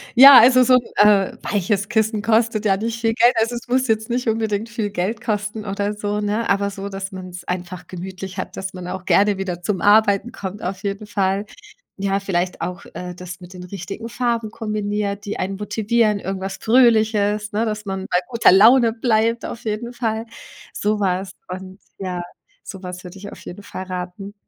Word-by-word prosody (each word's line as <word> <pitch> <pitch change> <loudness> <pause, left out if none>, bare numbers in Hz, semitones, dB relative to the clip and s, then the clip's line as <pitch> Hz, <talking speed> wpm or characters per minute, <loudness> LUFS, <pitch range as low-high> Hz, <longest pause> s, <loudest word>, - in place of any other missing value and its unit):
Ja, 270 +1 +11
also, 255 +2 +7
so 255 - +4
'n, - - +6 0.3
äh, 200 -2 +3
weiches 200 0 -1
Kissen 220 -2 +1
kostet 220 0 +1
ja 195 -2 +3
nicht 230 +2 -3
viel 225 0 +2
Geld. 240 +2 +5
Also 230 +2 0
es 235 - -7
muss 255 +1 +1
jetzt 220 0 0
nicht 245 +1 -1
unbedingt 220 0 -1
viel 225 -3 -2
Geld 205 +4 -2
kosten 210 -1 -3
oder 200 +1 -2
so, 205 0 -2
ne, 210 +3 -1
aber 200 0 +2
so, 200 0 -6
dass 195 0 -6
man's 185 -2 -8
einfach 180 0 -5
gemütlich 185 +1 -7
hat, 185 - -5
dass 190 0 -5
man 180 -1 -7
auch 185 +1 -6
gerne 200 0 +3
wieder 180 -2 -4
zum 190 +1 -2
Arbeiten 205 +1 +4
kommt 200 -3 -7
auf 190 +2 -4
jeden 200 +1 -4
Fall. 195 -1 0 0.6
Ja, 195 0 +1
vielleicht 180 -2 -2
auch, 180 +2 -5
äh, 180 0 -6
das 180 0 -9
mit 180 +1 -12
den 180 -1 -9
richtigen 195 +4 -7
Farben 235 -2 -1
kombiniert, 210 -2 -3
die 205 - -4
einen 195 +1 -3
motivieren, 215 +1 +1
irgendwas 195 0 -4
Fröhliches, 220 -3 +3
ne, 215 +2 0
dass 215 -1 -3
man 190 -1 -4
bei 180 - +3
guter 235 -2 +5
Laune 230 +4 +6
bleibt 230 0 +1
auf 235 - -7
jeden 220 +2 -3
Fall. 225 -2 -2 0.5
So 210 +1 0
was 190 -1 -1 0.2
und 185 +1 -8 0.2
ja 180 -2 -4 0.4
sowas 180 -2 -8
würde 180 +1 -10
ich 200 +1 -9
auf - - -11
jeden 190 +3 -9
Fall 185 - -7
raten. 185 +2 -6
205 Hz, 190 wpm, -21 LUFS, 190-225 Hz, 0.6 s, Ja